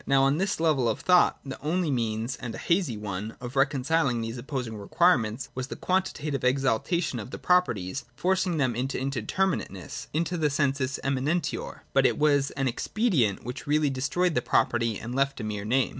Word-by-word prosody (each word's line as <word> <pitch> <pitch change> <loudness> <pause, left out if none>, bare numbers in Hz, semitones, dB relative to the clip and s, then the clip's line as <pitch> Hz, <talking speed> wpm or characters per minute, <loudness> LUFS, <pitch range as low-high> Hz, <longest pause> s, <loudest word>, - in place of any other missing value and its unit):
Now 135 -1 +4
on 140 +3 +2
this 195 -2 0
level 150 -7 +2
of 110 - -1
thought 180 -1 +4
the 135 - -7
only 165 +1 0
means, 115 -1 -1
and 120 -3 -6
a - - -6
hazy 170 - 0
one, 105 +1 -5
of 125 +1 -7
reconciling 135 -1 +2
these 115 +2 -4
op 135 - -11
posing 125 -6 -3
requirements 120 - +1
was 130 0 -4
quantitative 155 -5 -1
exaltation 135 +3 +1
of 105 - -7
the - - -6
properties, 140 - +1
forcing 185 +2 +1
them 130 -5 +1
into 130 +3 -2
indeterminateness, 135 - -2
— - - -36
into 170 +2 0
the 155 -2 +2
sensus 140 -1 0
eminentior. 140 +5 -1
But 135 -1 +5
it - - -1
was 145 -2 +3
an 135 -1 +1
expedient 130 - 0
which 125 +3 -6
really 150 -1 +2
destroyed 150 +7 0
the 125 - +1
property 115 -2 +1
and 120 +2 -6
left 140 +1 0
a - - -4
mere 105 -1 -4
name. 125 +4 +2
135 Hz, 185 wpm, -27 LUFS, 120-155 Hz, -, But